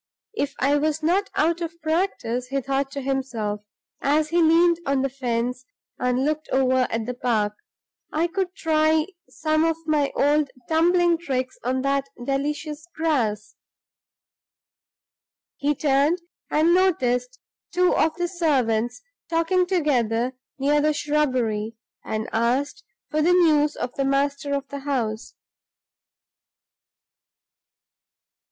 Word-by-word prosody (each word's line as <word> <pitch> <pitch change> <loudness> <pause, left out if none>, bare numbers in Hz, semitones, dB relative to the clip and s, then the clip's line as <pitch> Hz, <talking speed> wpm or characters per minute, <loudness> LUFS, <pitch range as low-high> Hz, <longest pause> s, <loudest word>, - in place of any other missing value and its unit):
"If 285 -9 -2
I 280 +2 +3
was 310 +1 -1
not 375 +5 +2
out 335 +2 +1
of 335 0 -5
practice," 315 -8 -1
he 275 +1 -1
thought 270 +1 -1
to 280 - -4
himself, 250 -6 -2 0.4
as 300 +2 +2
he 340 +1 +2
leaned 335 +1 +4
on 275 -2 +1
the 275 - 0
fence 250 -1 -2 0.4
and 250 +1 +1
looked 310 +1 -2
over 260 -1 +2
at 225 -1 -2
the 250 - -3
park, 225 -4 0 0.6
"I 315 +2 +1
could 370 +1 -2
try 315 -1 +2 0.2
some 310 0 0
of 325 -1 +1
my 300 -3 +1
old 290 0 +2 0.2
tumbling 340 +1 +3
tricks 260 -6 -3
on 260 +2 -1
that 275 0 0 0.2
delicious 295 +3 -3
grass." 230 -10 0 2.0
He 290 +1 0
turned, 295 +5 +2 0.3
noticed 300 -7 +2 0.3
two 360 +1 +3
of 320 0 +2
the 350 0 -1
servants 245 -9 0 0.3
talking 350 +2 +2
together 255 - +1 0.2
near 290 +2 +2
the 305 0 +2
shrubbery, 250 -8 0 0.3
and 220 0 -3
asked 250 - 0 0.3
for 310 0 +1
news 315 -3 +4
of 245 - -4
the 275 - -1
master 280 +1 0
of 280 0 -4
the 280 - -5
house. 240 -6 -3
285 Hz, 120 wpm, -24 LUFS, 255-320 Hz, 2.0 s, leaned